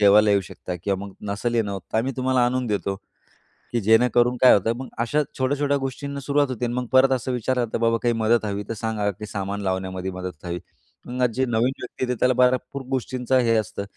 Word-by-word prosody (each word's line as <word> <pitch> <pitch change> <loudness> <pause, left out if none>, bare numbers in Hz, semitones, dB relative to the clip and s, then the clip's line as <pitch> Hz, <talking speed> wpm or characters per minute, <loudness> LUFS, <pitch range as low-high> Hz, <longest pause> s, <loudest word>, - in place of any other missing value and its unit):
जेवायला 105 +1 +6
येऊ 100 -1 +4
शकता 90 - -6
किंवा 100 0 -1
मग 95 - -12 0.2
नसल 120 +4 -2
येणं 110 -3 +1
होत 95 - -4
तर 110 - +2
आम्ही 130 +4 0
तुम्हाला 130 -1 +2
आणून 125 0 -1
देतो. 100 -2 -1 0.8
की 120 - +1
जेणेकरून 120 +3 +4
काय 130 - +8
होतं 115 +4 +2
मग, 130 - -6
अशा 145 +6 +1 0.2
छोट्या-छोट्या 140 +2 +1
गोष्टींना 140 +1 -4
सुरुवात 140 0 +1
होते. 125 -1 -2
आणि 120 - -2
मग 125 0 -2
परत 130 +1 +5
असं 130 0 0
विचारलं 125 +1 0
जातं, 110 - -4
बाबा 115 0 +2
काही 120 - +3
मदत 115 0 +2
हवी 100 0 -3
तर 115 - -1
सांगा, 110 -2 -1
की 105 +3 -9
सामान 100 0 -4
लावण्यामध्ये 95 -1 -2
मदत 90 -3 -7
हवी. 85 0 -3 0.5
मग 125 +1 0
जे 130 +2 0
नवीन 120 +1 +1
व्यक्ती - - -6
येते 125 - 0
त्याला 125 0 +4
भरपूर 125 +2 +1
गोष्टींचं 130 0 0
हे 115 -2 +3
असतं. 100 -2 -2
120 Hz, 215 wpm, -24 LUFS, 100-130 Hz, 0.8 s, काय